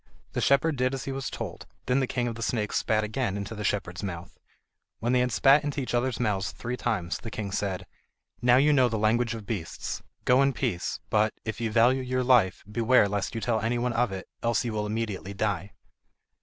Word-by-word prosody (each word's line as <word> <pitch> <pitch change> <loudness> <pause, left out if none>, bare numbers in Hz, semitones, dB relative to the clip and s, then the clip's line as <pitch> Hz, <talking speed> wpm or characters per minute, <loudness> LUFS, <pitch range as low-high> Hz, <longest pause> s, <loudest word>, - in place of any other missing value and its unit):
The - - -1
shepherd 140 +2 +3
did 130 +1 +1
as 135 - -6
he 135 - -3
was 135 -1 -3
told, - - -6 0.2
then 125 +2 +2
the 130 - 0
King 120 -1 -1
of 120 - -2
the 115 - -8
Snakes 110 -3 -1
spat 110 -1 +1
again 105 -2 -1
into 100 +2 -5
the 105 -1 -5
shepherd's 95 -4 -2
mouth. 85 -4 -6 0.6
When 120 +2 0
they 125 - +4
had 125 0 +1
spat 135 +5 +5
into 145 0 -2
each 130 - -3
other's 120 0 0
mouths 105 -5 0
three 120 +1 -4
times, 85 -7 -2
the 115 - -7
king 105 -3 -5
said: 95 -1 -2 0.6
"Now 125 0 +5
you 145 +3 +5
know 130 -3 +4
the 110 - -1
language 115 +2 +2
of 110 -2 -8
beasts, 95 -7 -4 0.2
go 125 +2 +5
in 140 0 +3
peace; 115 -10 -2
but, 110 0 +2
if 110 0 -4
you 115 - 0
value 120 +4 +4
your 130 0 -1
life, 120 -8 +3
beware 115 0 +4
lest 100 +3 -2
you 115 - -2
tell 115 -2 +1
any 115 +2 0
one 120 0 0
of 115 -2 +1
it, 95 -1 -6
else 115 0 +1
you 115 - -2
will 105 -1 -1
immediately 105 -3 -3
die." 100 -2 -1
115 Hz, 225 wpm, -27 LUFS, 105-125 Hz, 0.6 s, spat